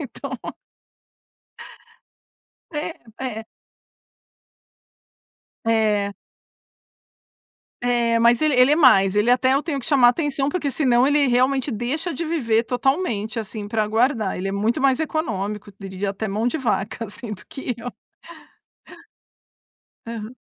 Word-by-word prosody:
então 275 Hz, -5 st, -7 dB, 2.4 s
É, 310 Hz, 0 st, -4 dB, 0.3 s
é. 225 Hz, -3 st, -4 dB, 2.2 s
É. 215 Hz, -3 st, +1 dB, 1.7 s
É, 240 Hz, -1 st, +2 dB
mas 235 Hz, +1 st, +4 dB
ele 305 Hz, -2 st, +3 dB
ele 250 Hz, +3 st, +6 dB
é -, -, +4 dB
mais, 195 Hz, -, +5 dB
ele 210 Hz, +3 st, +3 dB
até 260 Hz, +1 st, +3 dB
eu 280 Hz, -, +1 dB
tenho 305 Hz, -4 st, -3 dB
que 260 Hz, -, -7 dB
chamar 270 Hz, -6 st, +5 dB
a -, -, +7 dB
atenção, 280 Hz, 0 st, -1 dB
porque 295 Hz, -1 st, -2 dB
se 280 Hz, +3 st, -2 dB
não 245 Hz, 0 st, +4 dB
ele 290 Hz, -1 st, +3 dB
realmente 255 Hz, +2 st, +2 dB
deixa 270 Hz, -, -2 dB
de 335 Hz, +5 st, -4 dB
viver 235 Hz, -9 st, +1 dB
totalmente, 245 Hz, -, -1 dB
assim, 215 Hz, -1 st, -5 dB
para 215 Hz, -1 st, 0 dB
guardar. 225 Hz, -1 st, +1 dB
Ele 185 Hz, +2 st, -3 dB
é -, -, -3 dB
muito 215 Hz, +4 st, 0 dB
mais 270 Hz, -1 st, +3 dB
econômico, 210 Hz, -, -3 dB
eu 195 Hz, 0 st, -10 dB
diria 190 Hz, +1 st, -3 dB
até 200 Hz, +3 st, -4 dB
mão 215 Hz, +4 st, 0 dB
de 320 Hz, -, -2 dB
vaca, 230 Hz, -3 st, -2 dB
assim, 215 Hz, +1 st, -6 dB
do 195 Hz, -, -8 dB
que 270 Hz, -5 st, -5 dB
eu. 245 Hz, +2 st, -6 dB, 2.1 s
Aham. 230 Hz, +1 st, -7 dB
240 Hz, 135 wpm, -22 LUFS, 215-275 Hz, 2.4 s, a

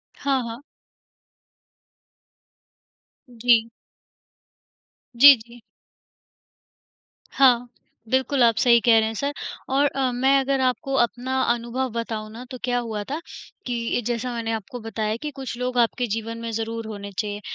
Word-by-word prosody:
हाँ, 275 Hz, -2 st, 0 dB
हाँ। 230 Hz, +2 st, -7 dB, 2.7 s
जी। 230 Hz, -1 st, +3 dB, 1.5 s
जी, 280 Hz, +3 st, +10 dB
जी। 235 Hz, +2 st, -15 dB, 1.7 s
हाँ, 245 Hz, -3 st, +4 dB, 0.4 s
बिल्कुल 260 Hz, 0 st, +2 dB
आप 230 Hz, -1 st, +4 dB
सही 235 Hz, -1 st, +5 dB
कह 230 Hz, 0 st, +5 dB
रहे 220 Hz, -, +1 dB
हैं 220 Hz, -, -4 dB
सर 280 Hz, +6 st, -2 dB, 0.4 s
और 275 Hz, +2 st, +3 dB
अ, 265 Hz, -2 st, -1 dB
मैं 265 Hz, +3 st, +3 dB
अगर 270 Hz, 0 st, 0 dB
आपको 260 Hz, +2 st, -1 dB
अपना 250 Hz, +3 st, -2 dB
अनुभव 240 Hz, +2 st, -3 dB
बताऊँ 220 Hz, -2 st, -4 dB
ना 230 Hz, +3 st, -9 dB
तो 255 Hz, -, -6 dB
क्या 245 Hz, 0 st, +1 dB
हुआ 220 Hz, -3 st, -4 dB
था, 285 Hz, +9 st, -4 dB, 0.5 s
कि 240 Hz, -1 st, -1 dB
जैसा 240 Hz, +1 st, -2 dB
मैंने 230 Hz, -1 st, -3 dB
आपको 225 Hz, +3 st, -5 dB
बताया 220 Hz, -1 st, -3 dB
कि 300 Hz, -1 st, -4 dB
कुछ 265 Hz, -3 st, -6 dB
लोग 250 Hz, 0 st, -3 dB
आपके 240 Hz, +1 st, +1 dB
जीवन 225 Hz, +1 st, -4 dB
में 230 Hz, -, -4 dB
ज़रूर 225 Hz, 0 st, -4 dB
होने 200 Hz, -2 st, -7 dB
चाहिए, 205 Hz, -1 st, -3 dB
240 Hz, 135 wpm, -23 LUFS, 225-260 Hz, 2.7 s, जी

